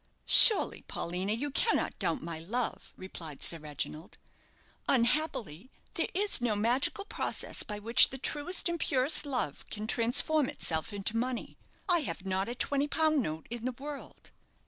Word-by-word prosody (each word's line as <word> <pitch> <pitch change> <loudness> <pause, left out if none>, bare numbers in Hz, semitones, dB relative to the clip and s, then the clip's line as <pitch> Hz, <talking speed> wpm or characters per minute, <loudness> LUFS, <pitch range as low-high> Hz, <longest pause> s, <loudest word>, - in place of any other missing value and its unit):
"Surely, 435 - +7
Paulina, 180 +4 -4
you 270 +7 -3
cannot 445 - -1
doubt 275 - -2
my 165 -1 -6
love," 225 +9 -5
replied 165 -5 -9
Sir 165 - +1
Reginald; 155 +4 -7 0.7
"unhappily, 245 - -1 0.2
there - - -1
is 400 -7 +3
no 235 -3 -1
magical 245 - -1
process - - -1
by 210 - -5
which 230 +3 +6
the 265 - -8
truest 305 +8 0
and 340 0 -3
purest 275 +3 +3
love 245 - -4
can 210 0 -6
transform 250 +6 +1
itself 160 +6 -3
into 205 +2 -3
money. 245 +1 -4 0.3
I 350 -2 +3
have 230 - -6
not 190 +2 -2
a 240 - -5
twenty 280 +3 +1
pound 310 -1 +1
note 160 -6 -6
in 240 -1 -6
the 255 +1 -3
world." 280 +3 -10
240 Hz, 155 wpm, -29 LUFS, 190-290 Hz, 0.7 s, Surely